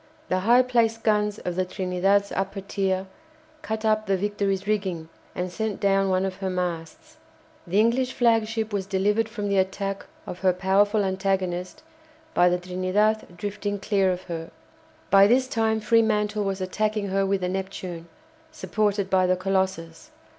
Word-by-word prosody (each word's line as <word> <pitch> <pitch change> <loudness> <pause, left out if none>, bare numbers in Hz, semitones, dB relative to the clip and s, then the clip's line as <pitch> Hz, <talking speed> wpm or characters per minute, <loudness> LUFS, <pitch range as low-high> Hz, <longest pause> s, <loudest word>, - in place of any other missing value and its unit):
The 185 - +1
high 240 +6 +5
placed 230 -3 +1
guns 210 -1 +1
of 180 -4 -4
the 185 - +1
"Trinidad's" 190 +2 0
upper 195 +1 -3
tier 190 -1 -1 0.6
cut 220 +1 -4
up 215 0 +1
the 195 -1 +2
"Victory's" 200 -1 -1
rigging 190 -6 -2 0.3
and 180 0 -3
sent 220 +1 -3
down 195 -1 +2
one 185 0 +1
of 190 -1 -4
her 195 -1 -3
masts. 175 -3 -4 0.5
The 190 +4 +2
English 250 +3 +2
flagship 225 -2 +1
was 195 -2 -2
delivered 210 +3 +1
from 210 -2 -4
the 200 -1 +2
attack 195 +1 -2 0.2
of 180 - -7
her 185 -2 +3
powerful 200 +3 +2
antagonist 190 - -2 0.5
by 180 0 +5
the 180 - +1
"Trinidad" 185 +2 -1
drifting 205 0 -3
clear 195 -1 +1
of 180 0 -4
her. 165 -2 -6 0.6
By 195 +1 +7
this 255 +3 +3
time 220 -3 0
Fremantle 215 -2 +2
was 195 -1 -2
attacking 210 +2 -1
her 195 +1 +1
with 195 0 0
the 180 - -1
"Neptune," 185 -3 -5 0.4
supported 210 -9 -1
by 185 -1 +3
the 185 - +3
"Colossus." 185 -3 -2
195 Hz, 160 wpm, -25 LUFS, 185-215 Hz, 0.6 s, By